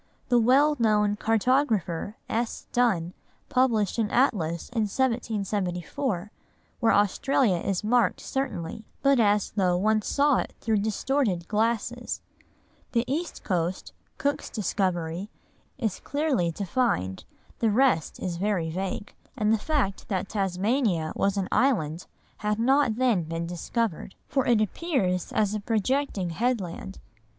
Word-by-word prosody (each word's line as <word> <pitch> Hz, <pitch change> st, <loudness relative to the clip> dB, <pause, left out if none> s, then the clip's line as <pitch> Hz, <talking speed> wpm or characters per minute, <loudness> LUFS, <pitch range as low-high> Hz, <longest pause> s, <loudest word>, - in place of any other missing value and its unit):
The 245 Hz, -1 st, +5 dB
well 275 Hz, +6 st, +4 dB
known 210 Hz, -2 st, +3 dB
cartographer, 220 Hz, -, +1 dB
S. 230 Hz, +1 st, -2 dB
Dunn, 190 Hz, -9 st, +1 dB, 0.4 s
published 235 Hz, -5 st, +2 dB
an 215 Hz, -2 st, +1 dB
atlas 170 Hz, -, +1 dB
in 225 Hz, -3 st, 0 dB
1774, 210 Hz, -3 st, -1 dB, 0.5 s
where 230 Hz, -, +3 dB
Australia 205 Hz, +1 st, +2 dB
is 190 Hz, +2 st, -2 dB
marked 240 Hz, +3 st, +2 dB
certainly, 220 Hz, -7 st, -4 dB, 0.2 s
but 275 Hz, -2 st, +4 dB
as 210 Hz, -2 st, +3 dB
though 185 Hz, -3 st, +2 dB
one 215 Hz, +3 st, +2 dB
saw 285 Hz, +5 st, +2 dB
it -, -, -3 dB
through 220 Hz, -2 st, +1 dB
distorted 210 Hz, -3 st, 0 dB
glasses; 230 Hz, +2 st, -1 dB, 0.7 s
the 235 Hz, -1 st, +3 dB
east 320 Hz, +6 st, -3 dB
coast, 180 Hz, -1 st, -2 dB, 0.2 s
Cook's 285 Hz, 0 st, -1 dB
discovery, 185 Hz, -3 st, -1 dB, 0.5 s
is 220 Hz, -5 st, -2 dB
clearly 285 Hz, -, 0 dB
defined, 175 Hz, -, -1 dB, 0.4 s
the 225 Hz, -, +3 dB
rest 220 Hz, -, +2 dB
is 175 Hz, -2 st, -3 dB
very 185 Hz, -4 st, 0 dB
vague; 190 Hz, +3 st, -4 dB, 0.2 s
and 215 Hz, -2 st, +2 dB
the 220 Hz, -, +2 dB
fact 255 Hz, -9 st, -1 dB
that 190 Hz, -1 st, -2 dB
Tasmania 195 Hz, -, 0 dB
was 200 Hz, 0 st, +1 dB
an 190 Hz, -2 st, 0 dB
island 185 Hz, -, +1 dB, 0.3 s
had 210 Hz, 0 st, -1 dB
not 260 Hz, 0 st, +3 dB
then 240 Hz, -6 st, +2 dB
been 165 Hz, +1 st, -4 dB
discovered, 185 Hz, +3 st, -3 dB
for 270 Hz, -2 st, 0 dB
it 235 Hz, -3 st, +4 dB
appears 215 Hz, -, -1 dB
as 210 Hz, -1 st, +1 dB
a 215 Hz, -, -1 dB
projecting 220 Hz, -3 st, 0 dB
headland. 195 Hz, -3 st, -2 dB
215 Hz, 125 wpm, -26 LUFS, 185-245 Hz, 0.7 s, The